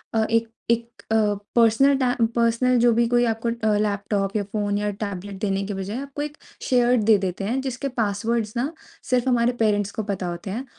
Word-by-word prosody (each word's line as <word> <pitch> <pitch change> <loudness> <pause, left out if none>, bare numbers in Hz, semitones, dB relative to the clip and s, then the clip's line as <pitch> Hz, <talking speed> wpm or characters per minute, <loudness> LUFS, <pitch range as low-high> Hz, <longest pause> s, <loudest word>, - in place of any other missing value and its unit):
अ, 220 - +3
एक 230 0 +2 0.2
एक 235 0 -2
अ, 220 - +3 0.4
पर्सनल 235 +5 +5
टै 255 -2 +1 0.2
पर्सनल 235 +2 +2
जो 240 0 +5
भी 235 +1 +2
कोई 240 +1 +3
आपको 225 0 -1
अ, 220 -3 0
लैपटॉप 200 -1 -1
या 210 - +1
फ़ोन 205 0 -2
या 210 0 -1
टैबलेट 200 -1 -6
देने 195 -2 0
के 205 - -3
बजाए 195 +3 -4
आपको 280 +1 -6
एक 300 +1 -5 0.3
शेयर्ड 245 -2 +3
दे 220 -2 +6
देते 190 0 -3
हैं, 240 +6 -1
जिसके 265 +1 -3
पासवर्ड्स 215 +2 -1
ना 270 +6 -1 0.4
सिर्फ़ 250 0 +2
हमारे 240 -1 +3
पेरेंट्स 205 -2 +1
को 220 - -4
पता 195 -3 -3
होते 175 +2 -5
हैं 245 +7 -4
225 Hz, 200 wpm, -23 LUFS, 205-240 Hz, 0.4 s, दे